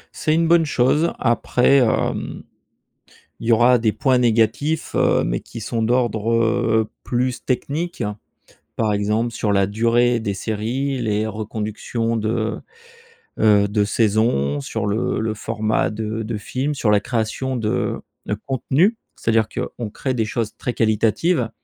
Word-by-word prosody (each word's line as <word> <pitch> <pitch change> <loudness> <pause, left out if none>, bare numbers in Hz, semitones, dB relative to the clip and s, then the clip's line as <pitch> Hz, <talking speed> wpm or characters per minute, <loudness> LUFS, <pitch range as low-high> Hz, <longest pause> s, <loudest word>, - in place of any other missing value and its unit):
C'est 155 0 +1
une 165 0 +2
bonne 170 0 +5
chose. 145 +4 +2
Après, 125 +2 +3
hem, 120 -5 0 1.0
il 115 - -5
y - - +5
aura 120 +2 +5
des 115 -1 +2
points 130 +4 +2
négatifs, 120 +6 +1
heu, - - +3
mais - - -1
qui 115 - -10
sont 115 +1 -2
d'ordre, 115 -2 +1
heu, 110 -1 +2
plus 125 0 -1
technique. 150 +7 -2 0.7
Par 110 -2 +1
exemple, 105 +3 0
sur 105 -2 -1
la 100 -1 +3
durée 115 +3 +2
des 105 -3 -2
séries, 120 +7 -2
les 110 -1 0
reconductions 110 +2 -3
de, 110 0 -1 0.8
heu, 105 -2 +4
de 105 0 +1
saisons, 100 - +1
sur 105 +8 -4
le 105 +3 0
le 110 -1 -1
format 110 -2 -1
de 110 0 -4
de 110 0 -3
films, 135 +7 -2
sur 115 -5 +1
la 105 - +5
création 120 +4 -2
de 110 -2 -1 0.3
de - - 0
contenus. 145 - +2 0.2
C'est-à-dire 115 -1 +1
qu'on 115 -3 -5
crée 130 +4 -3
des 115 -3 0
choses 110 0 -3
très 125 - -3
qualitatives 115 - +1
115 Hz, 145 wpm, -21 LUFS, 110-125 Hz, 1.0 s, bonne